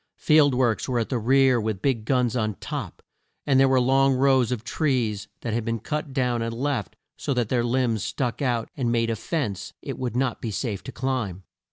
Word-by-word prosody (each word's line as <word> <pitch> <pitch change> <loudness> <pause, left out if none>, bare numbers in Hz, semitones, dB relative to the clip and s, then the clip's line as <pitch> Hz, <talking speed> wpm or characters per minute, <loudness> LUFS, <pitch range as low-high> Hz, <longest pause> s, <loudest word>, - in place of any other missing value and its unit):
Field 150 -4 +4
works 125 -1 +1
were 125 - 0
at 115 - -1
the 125 - 0
rear 130 +1 +4
with 110 -3 -2
big 125 -6 0
guns 125 -1 +1
on 110 -4 0
top, - - -6 0.4
and 135 -2 +3
there 135 - +6
were 130 -1 +4
long 135 +1 +3
rows 130 -2 +3
of 120 -3 -2
trees 115 -7 -1
that 115 - -3
had 115 0 0
been 115 0 -1
cut 150 +6 -4
down 125 -3 0
and 115 0 -3
left 130 -6 -2 0.2
so 140 - -2
that 120 -3 0
their 120 -2 +1
limbs 120 -3 0
stuck 125 +1 -2
out 120 -4 0
and 125 -6 0
made 115 -1 +1
a - - -1
fence 110 - -3
it - - -6
would 125 -2 -3
not 125 -1 0
be 115 - -3
safe 105 -1 -3
to 130 - -6
climb. 120 -10 -3
125 Hz, 215 wpm, -25 LUFS, 115-135 Hz, 0.4 s, there